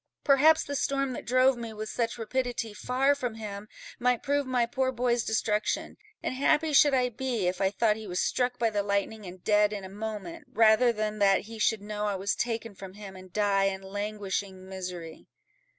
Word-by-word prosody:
perhaps 300 +3 +5
the 285 - -5
storm 275 -1 0
that - - -7
drove 255 +2 +4
me, 235 -1 -6
with 215 0 -5
such 230 0 -2
rapidity, 240 -1 -2
far 260 +6 +1
from 250 -5 -4
him, 210 -2 -7 0.3
might 250 -1 +1
prove 285 -1 0
my 250 -2 +2
poor 260 +2 -1
boy's 240 -1 +1
destruction; 215 -1 -1 0.3
and - - -1
happy 295 +4 +2
should 285 0 +6
I 250 -1 +2
be, 240 -4 -2
if 180 +1 -1
I 190 - +3
thought 210 +1 +1
he 220 -1 -8
was 180 -1 -2
struck 250 +4 0
by 230 -2 +1
the 205 -1 0
lightning, 200 +1 -2
and 180 0 -11
dead 210 -1 +3
in 205 -2 -5
a 190 - -8
moment, 220 - -6
rather 225 +2 +5
than 215 -1 -3
that 195 -1 +4
he 225 +1 -10
should 215 -1 +1
know 210 0 -3
I 205 - -1
was 195 +2 -1
taken 230 -2 -3
from 190 -1 -10
him, 200 -2 -9
and 185 -1 -12
die 200 0 +2
in 195 0 -2
languishing 200 -1 -4
misery." 180 -4 -7
220 Hz, 200 wpm, -28 LUFS, 200-250 Hz, 0.3 s, should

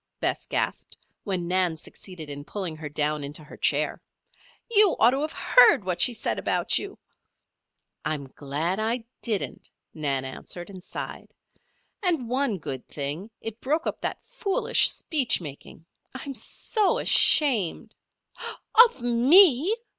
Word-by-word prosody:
Bess - - -2
gasped, - - -3 0.3
when 185 -4 -3
Nan 180 -2 +1
succeeded 160 +1 -8
in 145 0 -7
pulling 180 -1 -5
her 155 -1 -7
down 150 0 -1
into 145 +2 -6
her 150 - -13
chair. - - 0 0.7
"You 425 -4 +4
ought 235 - +5
to 270 +2 -2
have 310 +1 -3
heard - - +5
what 180 -1 -2
she - - +7
said 225 - -3
about - - +1
you 400 0 -8 0.5
" - - -56
"I'm 140 -3 -4
glad 155 +7 -3
I 225 +2 -2 0.2
didn't," 215 -5 -2 0.2
Nan 140 -4 -2
answered 175 +7 -7
and 185 -2 -11
sighed. - - -8 0.7
"And 335 - 0
one 255 -3 -1
good 135 -5 -7
thing 150 +8 -5
it 225 +1 -7
broke 310 +5 -1
up - - -4
that - - -4
foolish 470 -6 +2
speech 265 -8 +1
making. 155 0 -11 0.3
I'm 275 +2 -6
so 390 - -1
ashamed 245 - +4 0.4
" 465 - +3
"Of 460 - -16
me!" 285 - +5
205 Hz, 145 wpm, -25 LUFS, -, 0.7 s, she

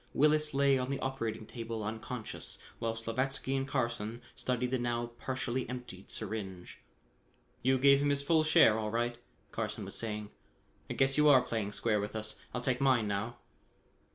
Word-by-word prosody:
Willis 150 0 +3
lay 140 -1 +4
on 125 +1 -2
the 140 - -1
operating 115 -5 -3
table 115 -1 -5
unconscious, 110 +2 -5 0.2
while 115 0 -1
Slavatsky 130 +4 -1
and 135 0 -1
Carson 120 -4 -2
studied 125 0 -1
the 130 - +1
now 120 0 -1
partially 130 -1 -2
emptied 125 -7 -7
syringe. 95 -4 -5 0.8
"You 130 +1 +3
gave 140 +1 +6
him 145 - +2
his 140 0 +1
full 160 +2 +4
share 110 -8 +6
all 105 -1 -1
right," 120 +2 -1 0.3
Carson - - -3
was - - -7
saying. 105 -2 -4 0.6
"I - - -3
guess 135 +2 +3
you 150 0 +7
are 130 -3 +7
playing 110 -4 -2
square 110 -1 +1
with 105 +2 -5
us. 110 0 -4 0.2
I'll 125 - -3
take 125 +1 0
mine 130 -5 +4
now." 105 +4 -2
120 Hz, 170 wpm, -32 LUFS, 110-135 Hz, 0.8 s, you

